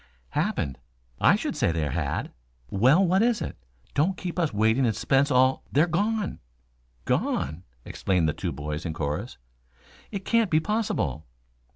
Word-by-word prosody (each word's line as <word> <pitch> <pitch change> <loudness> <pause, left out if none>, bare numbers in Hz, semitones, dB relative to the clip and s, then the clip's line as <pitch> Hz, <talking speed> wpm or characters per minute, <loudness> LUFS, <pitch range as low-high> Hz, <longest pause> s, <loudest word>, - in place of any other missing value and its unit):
"Happened? 65 +1 -1 0.4
I - - +6
should - - -3
say - - +2
there 80 -3 -1
had - - -2 0.2
" - - -40
"Well, 130 - +5
what 185 +3 +3
is 235 -1 +2
it? - - -4 0.4
Don't 175 +6 +1
keep 180 0 -4
us 165 -3 +1
waiting 110 +5 +2
in 115 -3 +2
suspense 135 +5 +2
all 130 0 +3
" - - -32
"They're 150 +4 +4
gone!" 205 +4 -1 0.7
"Gone?" 80 +6 -1 0.2
exclaimed 90 -4 0
the 75 - +1
two - - -3
boys 75 +3 -5
in 80 - -3
chorus. 75 -2 -3 0.7
"It 195 -3 -6
can't 230 -3 +2
be 155 - +4
possible." 210 - -1
135 Hz, 165 wpm, -26 LUFS, -, 0.7 s, I